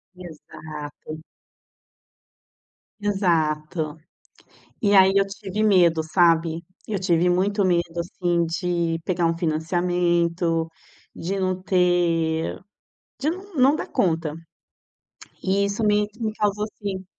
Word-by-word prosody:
Exato. 155 -3 -9 1.8
Exato. 160 -5 0 0.8
E 205 -1 +3
aí 190 0 +7
eu 195 0 +4
tive 195 +1 -5
medo, 180 -6 +4
sabe? 165 0 +2 0.2
Eu 210 - -1
tive 180 -2 +2
muito 195 +3 +1
medo, 170 -2 0
assim, 175 0 0
de 170 -1 -1
pegar 175 -2 +1
um 165 0 -1
financiamento, 170 0 0 0.5
de 195 +4 -3
não 185 -1 -1
ter 175 -3 +1 0.6
de 305 +4 0
não 385 +3 -9
não 270 +2 +4
dar - - -4
conta. 165 -4 0 1.1
E 195 +1 +1
isso 200 +3 -2
me 210 0 +3
me 220 -1 -1
causou 210 0 0
sim. 190 -2 -4
175 Hz, 110 wpm, -23 LUFS, 165-195 Hz, 1.8 s, aí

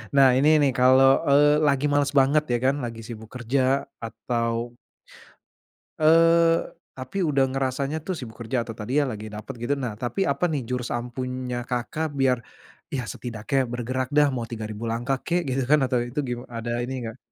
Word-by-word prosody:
nah 135 -1 +7
ini 145 +3 +4
nih 140 - +3
kalau, 130 +1 +6
eee, 145 +1 +5
lagi 140 0 +2
males 145 0 +2
banget 140 +3 +3
ya 120 - +3
kan, 135 - +3
lagi 115 -1 -7
sibuk 110 -2 -9
kerja 130 +3 +1 0.2
atau 115 +1 -3 1.2
eee, 165 +1 +5 0.3
tapi 130 +9 -3
udah 140 -3 +2
ngerasanya 135 +3 -2
tuh 190 - -2
sibuk 115 -5 -9
kerja 120 +2 -1
atau 115 -1 -7
tadi 125 +8 0
ya, - - +1
lagi 110 -2 -6
dapet 110 +6 -7
gitu 120 +4 -1
nah 125 -5 -3
tapi 125 - -3
apa - - +1
nih 155 -6 -1
jurus 125 -1 -2
ampuhnya 125 0 -4
Kakak, 145 +6 -3
biar 135 -2 +2 0.6
ya 130 - -1
setidaknya 125 +3 -2
bergerak 125 +1 -3
dah 150 0 +5
mau 125 -3 -3
3000 110 -1 -6
langkah 120 +4 -1
kek 175 +1 +1
gitu 130 0 0
kan 150 0 +5
atau 125 -1 0
itu 120 +4 -4
gima 125 -2 -5
ada 120 0 -5
ini 130 - -5
enggak? 115 -2 -6
130 Hz, 175 wpm, -24 LUFS, 120-140 Hz, 1.2 s, nah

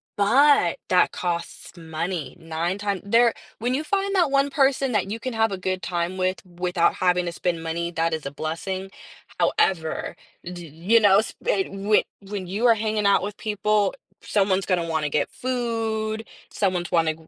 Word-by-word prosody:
but 235 - +4
that 180 -1 +4
costs 170 0 -4
money. 165 0 -4
9 165 +3 -2
times 200 -2 -2
there 230 +3 +4 0.3
when 245 +3 0
you 285 +4 0
find 395 +2 0
that 345 -5 +3
one 275 0 +2
person 270 -1 +2
that 210 -3 0
you 215 - -3
can 255 - -4
have 225 0 +2
a 195 - -3
good 185 0 -2
time 175 +1 -2
with 185 +1 -1
without 180 -1 0
having 180 -1 +2
to 170 - -2
spend 170 -1 -2
money, 170 +1 -2
that 165 -1 0
is 160 -2 -4
a 140 - -4
blessing. 185 +6 -4 0.5
However, 165 -2 +1 0.3
d 175 -1 -8
you 170 +10 +2
know, 205 -2 +6
sp - - -8
and 195 0 -1
when 215 - +5 0.2
when 195 -2 -6
you 205 +6 -1
are 230 - +7
hanging 215 -1 -1
out 200 0 +4
with 205 +1 -5
people, 210 -1 +1 0.3
someone's 195 -2 +1
gonna 180 -3 +1
wanna 160 -2 0
get 145 - 0
food. 225 -3 -2 0.3
Someone's 180 -4 -1
wanna 165 -3 +2
190 Hz, 175 wpm, -24 LUFS, 175-220 Hz, 0.5 s, are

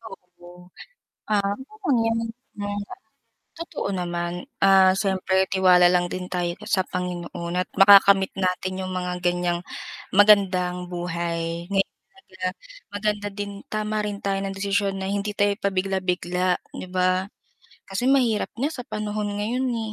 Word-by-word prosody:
Oo. 180 -4 -14 0.6
Ah, 200 -1 +2
okay 360 +1 -3
lang 225 0 +1 0.4
yan. 205 0 -3 0.8
Totoo 335 -11 -4
naman, 175 +1 -3 0.2
ah, 190 -1 +6
siyempre 190 -1 +1
tiwala 185 -2 +5
lang 180 0 +2
din 185 0 -5
tayo 175 -1 -1
sa 205 -4 0
Panginoon 175 -1 -4
at 180 - 0
makakamit 195 -1 +7
natin 185 0 -1
yung 185 - -4
mga 180 -1 -3
ganyang 175 -1 +1 0.5
magandang 185 -3 +4
buhay, 170 -1 -3
ngayon 195 -1 0 0.2
talaga, 185 - -7 0.5
maganda 205 0 -1
din 205 0 -4
tama 215 0 -2
rin 205 -1 -4
tayo 195 -1 0
ng 195 - -4
desisyon 200 0 0
na 190 - -2
hindi 205 +1 -2
tayo 205 0 +2
pabigla-bigla 185 -2 0 0.2
di - - -6
ba? 185 0 +1 0.6
Kasi 220 +7 0
mahirap 245 -6 +2
na 270 - +1
sa 250 - -6
panahon 210 -1 -3
ngayon 245 +5 -1
eh, 225 -2 -3
190 Hz, 135 wpm, -24 LUFS, 180-205 Hz, 0.8 s, makakamit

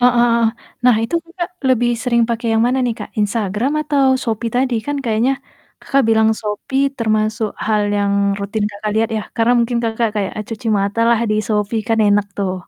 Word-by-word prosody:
Heeh 245 0 +5
heeh. 235 -1 +3 0.4
Nah 245 -3 +6
itu 230 +9 -3
Kakak 345 +1 -5 0.2
lebih 240 -1 +3
sering 235 -2 +2
pakai 235 0 -2
yang 225 - +3
mana 260 +2 +1
nih 235 -2 0
Kak? 210 - -7
Instagram 210 +4 0
atau 290 -3 +1 0.2
Shopee 230 0 -2
tadi? 255 -1 +1
Kan 290 0 -1
kayaknya 230 +4 +1 0.5
Kakak 275 0 +2
bilang 220 0 +4
Shopee 265 +6 -1
termasuk 215 0 0 0.2
hal 215 -1 +2
yang 200 0 +1 0.3
rutin 205 +1 -2
Kakak 205 +1 -4
lihat 225 0 +2
ya 215 - -2
karena 230 +1 +3
mungkin 235 0 +1
Kakak 225 0 0
kayak 195 -2 -1
a - - -2
cuci 225 0 -6
mata 200 +3 -2
lah 235 - +4
di - - +2
Shopee 210 +1 0
kan 225 0 +2
enak 205 0 +3
tuh. 190 -2 -1
225 Hz, 195 wpm, -18 LUFS, 215-245 Hz, 0.5 s, Nah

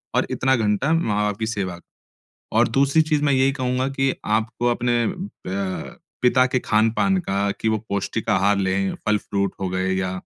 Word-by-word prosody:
और - - +2
इतना 130 +1 +2
घंटा 110 +5 +1
माँ-बाप 105 -9 0
की 110 - -1
सेवा। 95 -5 -3 0.7
और - - +4
दूसरी 140 +3 +3
चीज़ 155 -2 0
मैं 140 -2 +3
यही 130 +1 +3
कहूँगा 130 -1 -1
कि 135 0 +2
आपको 110 +3 0
अपने 120 -1 +1 0.4
प 95 0 -4 0.3
पिता 125 +1 +5
के 130 0 0
खान-पान 115 - +2
का, 100 - -1
कि 110 - -4
वो 110 - +1
पौष्टिक 100 +3 -2
आहार 100 0 +3
लें, 95 0 0
फल 105 0 +4
फ्रूट 100 -1 -2
हो 95 - -1
गए 95 +1 -1
या 95 -1 -1
110 Hz, 175 wpm, -22 LUFS, 100-130 Hz, 0.7 s, पिता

